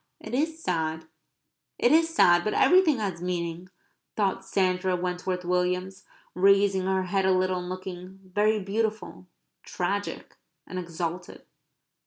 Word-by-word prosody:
It - - -9
is 320 +4 -1
sad, 160 -2 -2 0.7
it 240 - +3
is 325 +1 +4
sad. 175 - +4
But 215 - -1
everything 355 -6 +5
has 195 -6 -3
meaning," 175 0 -4 0.5
thought 200 -3 0
Sandra 185 -1 0
Wentworth 180 0 -3
Williams, 180 +1 -1 0.3
raising 195 0 +3
her 190 0 +1
head 190 +1 0
a - - +4
little 185 0 +1
and 180 0 -6
looking 185 0 -7
very 210 +3 +1
beautiful, 210 -1 -3 0.4
tragic, 200 +3 -4 0.3
and 185 - -5
exalted. 175 0 -5
185 Hz, 130 wpm, -26 LUFS, 180-200 Hz, 0.7 s, everything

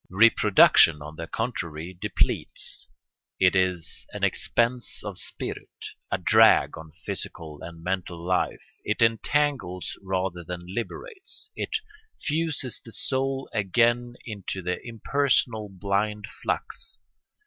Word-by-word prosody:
Reproduction, 95 -6 +6
on 75 +1 -9
the 80 +1 -6
contrary, 85 -7 -3
depletes; 100 +4 -1 0.5
it 90 0 +5
is 90 -3 0
an - - -6
expense 120 +1 +1
of - - -4
spirit, - - -3 0.4
a - - +1
drag - - +5
on 80 0 -10
physical 80 -6 -6
and 85 -1 -9
mental 90 -1 -2
life; 90 +2 -1 0.2
it 105 +2 +1
entangles 115 - +1
rather 95 -2 -2
than 90 +1 -5
liberates; 375 - -5
it - - -3 0.4
fuses 155 -5 -1
the 115 - -9
soul 135 +2 0
again 120 +4 +2
into 100 -4 -5
the 90 +1 -1
impersonal, 115 -2 +1
blind 100 +2 -1 0.2
flux. - - -3
100 Hz, 115 wpm, -26 LUFS, 90-120 Hz, 0.5 s, Reproduction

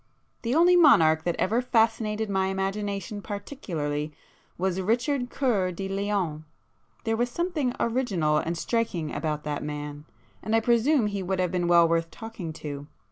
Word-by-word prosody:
The 240 +3 -1
only 350 +2 +6
monarch 160 - +6
that 175 - 0
ever 225 +6 +1
fascinated 220 -2 +1
my 190 -1 +1
imagination 200 +2 -3
particularly 165 - -4 0.5
was 190 +1 0
Richard 245 +5 0
Cœur 200 -11 0
de 195 +2 -4
Lion; 195 -6 -1 0.6
there 225 0 0
was 240 +2 0
something 305 -4 -1
original 195 -11 +1
and 165 +2 -3
striking 175 -7 -1
about 150 0 -2
that 150 -1 -3
man, 150 0 -6 0.4
and 220 - 0
I - - +5
presume 240 +3 +3
he 200 -1 -2
would 190 0 -2
have 180 -2 +1
been 175 -1 0
well 170 -1 +6
worth 165 0 0
talking 225 -5 -7
to. 145 -1 -5
195 Hz, 155 wpm, -26 LUFS, 165-230 Hz, 0.6 s, only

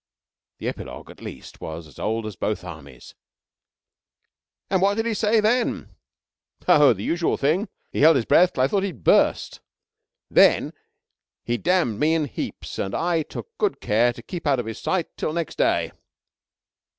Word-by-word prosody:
The - - -5
epilogue, - - -7
at - - -16
least, - - -10
was 80 +1 -6
as 75 - -16
old 110 +1 -2
as 105 -2 -6
both 105 -4 -2
Armies: 70 -8 -11 1.5
"And 190 -1 +1
what 200 +1 +3
did 225 +1 -1
he 230 - 0
say 220 +1 +2
then?" 230 +3 +1 0.8
"Oh, 150 -6 +7
the 100 -1 -7
usual 170 +5 0
thing. 170 +9 +1 0.2
He - - -2
held 160 +2 +7
his 125 -4 +1
breath 180 +1 +4
till 130 - +1
I - - +4
thought 195 +7 0
he'd 185 - -5
burst. - - +2 0.7
Then - - +4 0.7
he 120 0 -1
damned 170 - +1
me 160 +2 +3
in 160 -2 +1
heaps, 135 - -6
and 95 - -2
I 170 -1 +1
took 455 - -9
good 415 -2 0
care 115 +4 +2
to 120 - -12
keep 175 -4 -6
out 135 -3 +3
of 120 - -3
his 110 -1 -6
sight 185 -4 -2
till 155 - -2
next 170 -2 -4
day." - - +2
155 Hz, 175 wpm, -23 LUFS, 110-185 Hz, 1.5 s, Oh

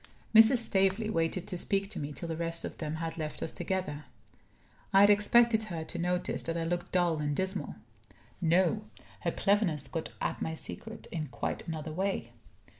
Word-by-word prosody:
Mrs. 225 +3 +8
Staveley 200 -1 +2
waited 165 0 0
to 180 - -3
speak 195 +1 0
to 195 - -3
me 145 0 -4
till 150 +4 -4
the 165 - -3
rest 165 0 -2
of - - -7
them 155 -1 -3
had 165 +1 -4
left 155 -1 -4
us 160 - -3
together. 155 -6 -3 0.9
I 195 0 +6
had 205 +1 +8
expected 220 +2 +4
her 170 -6 -4
to 160 - -6
notice 180 +1 -1
that 165 0 -3
I 165 - -1
looked 175 +1 -2
dull 175 -3 +2
and 145 -1 -1
dismal. 190 +3 -2 0.7
No! 170 - +3 0.3
her - - -1
cleverness 195 -8 +1
got 165 -2 -4
at - - -2
my 160 - -2
secret 225 +7 -7
in 155 -3 -3
quite - - -4
another 160 -1 -4
way. 190 -9 -2
175 Hz, 185 wpm, -31 LUFS, 160-195 Hz, 0.9 s, Mrs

